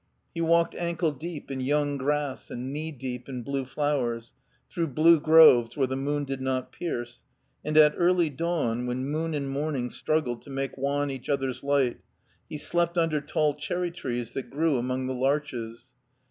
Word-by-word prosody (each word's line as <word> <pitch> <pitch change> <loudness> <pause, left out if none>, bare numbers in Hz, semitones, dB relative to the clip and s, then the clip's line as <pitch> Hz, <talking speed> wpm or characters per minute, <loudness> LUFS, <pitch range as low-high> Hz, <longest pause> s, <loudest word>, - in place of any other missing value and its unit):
He 165 - -3
walked 170 0 +3
ankle 170 -1 -1
deep 150 +1 -7
in 135 - -3
young 145 +2 +1
grass 145 0 -1
and 130 +3 -5
knee 155 +2 -4
deep 125 -2 -6
in 125 -2 -5
blue 135 +1 -2
flowers, 125 -5 -1 0.3
through 170 -1 -2
blue 160 +3 +5
groves 155 -7 +6
where 135 - +3
the 130 +1 -3
moon 145 +2 -1
did 135 -1 -4
not 130 -1 -2
pierce, 120 -8 -5 0.4
and 155 +1 -1
at 150 -1 +7
early 175 -2 +3
dawn, 130 -6 -1
when 125 +1 -2
moon 155 +3 -2
and 140 -2 -2
morning 135 -3 -2
struggled 145 -7 -1
to - - -14
make 135 0 -3
wan 140 +1 -1
each 135 -2 -8
other's 135 -3 -1
light, 140 -3 +1 0.5
he 150 - -5
slept 170 +3 -1
under 165 -3 +2
tall 150 +1 +1
cherry 175 +4 -3
trees 120 -8 -4
that 135 - -5
grew 150 -2 +1
among 130 +1 -2
the 130 - -2
larches. 130 -3 -2
140 Hz, 175 wpm, -27 LUFS, 130-155 Hz, 0.5 s, at